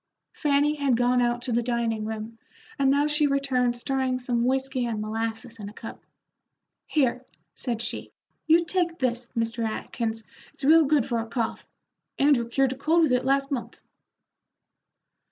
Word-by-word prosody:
Fanny 290 0 +2
had 275 -4 +2
gone 245 +1 +3
out 240 0 0
to 255 - -3
the 235 +1 +2
dining 230 -2 -1
room, 220 +1 -6 0.4
and 275 -1 +4
now 285 +2 +3
she 300 0 +2
returned 260 -3 +1
stirring 260 0 -1
some 245 -2 -1
whiskey 260 0 0
and 225 -2 -2
molasses 225 +2 -4
in 205 -1 -6
a - - -13
cup. 225 - -9 0.8
"Here," 255 -4 +1 0.3
said 235 -3 -3
she, - - -5 0.4
"you 335 +2 +5
take 340 -1 -1
this, 245 -2 -1
Mr. 230 0 -1
Atkins; 225 0 -3 0.3
it's - - -6
real 320 +2 +7
good 285 -4 +3
for 235 -2 -1
a 225 - -4
cough. 230 -1 -3 0.5
Andrew 270 -5 +3
cured 265 +1 +2
a - - -12
cold 325 +4 +3
with 305 - +2
it 250 0 +2
last 275 +1 +1
month." 255 -4 -4
250 Hz, 165 wpm, -26 LUFS, 230-275 Hz, 0.8 s, real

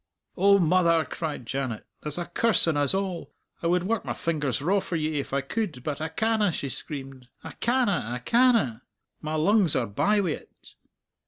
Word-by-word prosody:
"O 200 +2 +5
mother," 170 -2 +3
cried 150 -6 -5
Janet, 130 -3 -3 0.2
"there's 150 +1 -5
a 175 - -2
curse 205 +2 +2
on 165 - +2
us 145 +3 +2
all! 190 -3 -3 0.3
I 170 - 0
would 175 +1 +2
work 220 +3 -1
my - - -4
fingers 150 -6 -1
raw 185 +8 +2
for 180 - -4
ye 155 -2 -1
if 140 - -5
I 140 0 +1
could, 145 - -3
but 150 +1 -3
I 160 - -2
canna," 220 +3 +1
she 140 -3 -4
screamed, 135 -2 -7 0.2
"I - - -7
canna, 240 -5 +1
I 120 +1 -3
canna! 225 - +3 0.4
My 155 +1 -3
lungs 185 +1 +3
are 125 - +1
bye 200 - +1
wi't. 180 -6 -5
165 Hz, 185 wpm, -26 LUFS, 140-200 Hz, 0.4 s, O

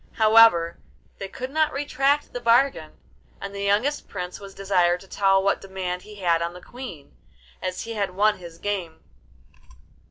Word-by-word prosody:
However, 215 -7 +5 0.4
they 195 - -4
could 255 +6 -7
not 310 +1 +2
retract 285 +1 0
the 245 - -3
bargain, 235 - +2 0.5
and 200 0 -7
the 200 - -5
youngest 210 +9 0
Prince 180 -2 -6
was 195 -1 -11
desired 180 -3 +2
to 195 - -15
tell 195 0 +2
what 200 - +1
demand 185 -2 -4
he 210 +3 -13
had 170 -4 +1
on 170 +1 -2
the 180 - -10
Queen, 235 - -10 0.5
as 185 0 -3
he 230 - -6
had 200 -4 -2
won 210 +1 +2
his 170 -2 -11
game. 180 -4 -4
195 Hz, 165 wpm, -24 LUFS, 180-230 Hz, 0.5 s, However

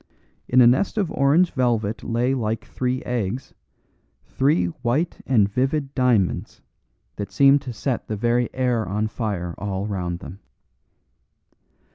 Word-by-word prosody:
In 130 +1 +5
a - - +8
nest 130 - +3
of 195 -6 0
orange 150 +6 +3
velvet 115 -5 0
lay 120 +3 0
like 110 -3 -2
three 130 0 -2
eggs, 120 +1 -3 0.7
three 145 +5 +1 0.2
white 135 +8 -1
and 110 -7 +4
vivid 135 +6 -1
diamonds 120 -8 0 0.5
that 100 -1 -5
seemed 140 0 +5
to 135 -3 -6
set 120 +2 -3
the 110 - -3
very 120 +2 +1
air 125 -3 0
on 105 +3 -1
fire 100 -7 -3
all 100 0 -3
round 90 -4 -3
them. 90 +2 -10
120 Hz, 135 wpm, -23 LUFS, 105-135 Hz, 0.7 s, a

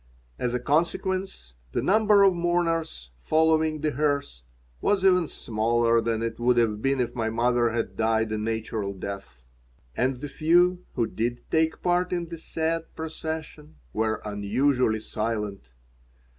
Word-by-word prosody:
As 125 0 -1
a - - 0
consequence, 165 - -1 0.2
the - - 0
number 210 0 +5
of 195 -1 +6
mourners 165 - -1
following 155 - +2
the 155 0 0
hearse 140 - -1 0.4
was 200 -2 +2
even 180 -3 +4
smaller 115 0 +1
than 115 0 -1
it 115 0 -3
would 120 +1 +3
have 110 -3 +2
been 135 +1 +1
if 125 - -1
my 115 -2 -1
mother 120 +1 +2
had 115 0 -3
died 110 0 +1
a 110 - -1
natural 110 -2 -3
death. 95 -10 -7 0.5
And 130 +1 +1
the 145 +4 -6
few 175 +5 +2
who 120 - +2
did 120 +2 -3
take 160 0 +1
part 180 0 +1
in 175 -2 -2
the 165 -1 -7
sad 165 0 -2
procession 160 -1 -6 0.2
were 110 0 -1
unusually 110 +3 +1
silent. 105 - -4
125 Hz, 145 wpm, -26 LUFS, 110-160 Hz, 0.5 s, of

